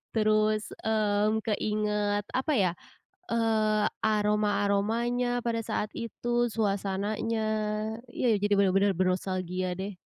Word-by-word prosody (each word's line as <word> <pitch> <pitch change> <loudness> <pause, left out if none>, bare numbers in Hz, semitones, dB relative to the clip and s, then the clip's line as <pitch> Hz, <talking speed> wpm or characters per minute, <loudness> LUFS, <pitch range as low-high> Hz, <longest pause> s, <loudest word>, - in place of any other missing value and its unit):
Terus, 215 0 +2 0.2
mmm, 215 0 +1
keingat, 210 -1 0
apa 265 +4 0
ya, 190 -7 +3 0.6
eee, 215 -2 +2 0.2
aroma-aromanya 215 +3 +1
pada 230 -1 0
saat 210 - -2
itu, 240 +1 -1
suasananya 205 +1 -1 0.7
iya 235 -4 +2
jadi 205 0 +2
benar-benar 195 +1 +3
bernostalgia, 185 0 -1
deh. 195 0 -4
210 Hz, 95 wpm, -28 LUFS, 200-225 Hz, 0.7 s, ya